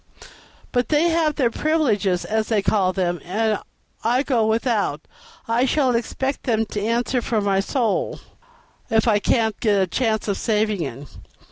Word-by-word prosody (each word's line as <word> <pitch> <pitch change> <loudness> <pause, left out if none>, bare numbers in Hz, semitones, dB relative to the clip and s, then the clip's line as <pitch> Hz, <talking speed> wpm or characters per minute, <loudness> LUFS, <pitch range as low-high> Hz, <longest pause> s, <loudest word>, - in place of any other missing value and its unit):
But 245 -1 0
they 310 +3 +3
have 325 -3 +1
their 250 -5 +1
privileges, 220 - +1
as 220 0 -1
they 215 -3 +1
call 190 -3 +2
them, 175 -2 -1
and 215 +4 0 0.4
I 245 +4 +2
go 235 -6 +1
without. 220 - 0 0.5
I 230 +3 +2
shall 265 -2 +2
expect 265 +4 -2
them 225 -3 +1
to 210 - -2
answer 240 +3 0
for 225 -1 0
my 200 -1 +1
soul, 260 - -1 0.7
if 225 +1 +2
I 210 -2 +4
can't 220 0 +1
get 210 -4 +2
a 190 - +3
chance 220 +3 -1
of 200 - -1
saving 215 -3 0
it." 135 -1 -6
225 Hz, 160 wpm, -22 LUFS, 205-250 Hz, 0.7 s, I